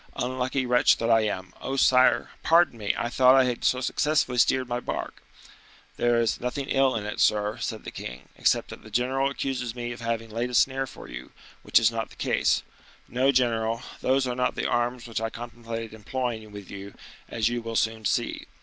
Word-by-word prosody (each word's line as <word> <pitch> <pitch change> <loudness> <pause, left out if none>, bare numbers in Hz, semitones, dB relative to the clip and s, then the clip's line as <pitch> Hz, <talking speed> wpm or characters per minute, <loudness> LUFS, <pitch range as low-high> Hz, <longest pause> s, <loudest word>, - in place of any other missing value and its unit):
Unlucky 130 +1 -1
wretch 125 0 +4
that 115 0 0
I 115 0 +5
am! 95 -3 -5
Oh! 135 - -3
sire, 130 -2 +4
pardon 165 -7 +4
me! 105 -2 +1
I - - -1
thought 130 +2 +5
I 135 - +6
had 125 -2 -2
so 125 - +2
successfully 140 -2 +1
steered 130 +1 +3
my 120 0 -2
bark." - - -5 0.8
"There 120 -1 +2
is 115 -1 0
nothing 125 +3 -2
ill 135 -1 +3
in 105 -2 -3
it, 105 - -5
sir," 105 0 +2
said - - -4
the - - -7
king, 60 +1 -8
"except - - +1
that - - -9
the 110 - -13
general 130 +5 +1
accuses 125 -4 -3
me 120 -1 -4
of 120 - -8
having 115 -1 -3
laid 120 +3 -2
a 125 - -3
snare 135 +1 +2
for - - -11
him, - - -9 0.3
which - - +3
is 115 0 +5
not 115 -1 -3
the - - -16
case. - - +1 0.4
No, 130 +3 +2
general, 115 -3 +1 0.2
those 130 +1 +2
are 125 - -1
not 125 0 0
the - - -2
arms 120 0 -1
which 115 -1 -3
I 115 - -1
contemplated 115 -1 -7
employing 110 0 -4
with 100 -2 -10
you, 100 0 -9 0.3
as 115 -1 +1
you 120 0 -2
will 115 0 -5
soon 110 0 0
see. - - -1
120 Hz, 205 wpm, -26 LUFS, 115-130 Hz, 0.8 s, I